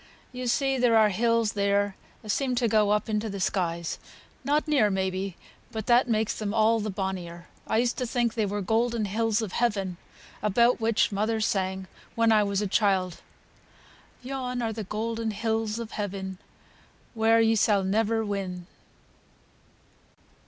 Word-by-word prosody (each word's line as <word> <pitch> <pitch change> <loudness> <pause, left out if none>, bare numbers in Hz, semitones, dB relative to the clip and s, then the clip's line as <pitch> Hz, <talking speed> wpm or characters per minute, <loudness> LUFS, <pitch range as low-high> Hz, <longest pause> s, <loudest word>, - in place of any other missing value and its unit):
You 250 0 -5
see 270 +2 +1
there 240 -2 +4
are 215 -1 +5
hills 230 +2 +1
there 200 0 +1 0.3
as 210 -1 -1
seem 265 -3 0
to 240 -1 +1
go 215 -1 +3
up 210 +2 +1
into 215 0 -1
th' 200 -1 -5
skies, 170 -3 -1 0.4
not 295 +4 +1
near 270 -9 +3
may 190 -1 0
be, 190 -1 -4 0.3
but 220 -2 -5
that 245 +2 +4
makes 220 -1 +1
them 210 0 -4
all 225 +1 +4
the 215 0 -3
bonnier. 185 -3 -5 0.2
I - - +1
used 240 +1 +1
to 250 - -1
think 235 -1 0
they 220 -3 0
were 205 +1 -2
the - - -6
golden 230 +1 +1
hills 225 +2 0
of 205 - -5
heaven, 195 -7 -1 0.4
about 235 +4 +3
which 225 0 +2
my 200 0 -2
mother 220 +1 0
sang 190 -2 -1 0.3
when 230 0 +3
I 215 -1 +5
was 200 0 0
a - - -1
child, 190 -3 +1 1.0
'Yon 250 -2 -3
are 225 -1 -1
the 215 -1 -5
golden 225 +2 -3
hills 220 +1 -1
o' 235 - -3
heaven, 195 -3 -5 0.7
Where 225 0 +3
ye 225 0 +4
sall 205 -2 +3
never 220 +3 +1
win.' 190 -3 -4
215 Hz, 170 wpm, -27 LUFS, 200-230 Hz, 1.0 s, are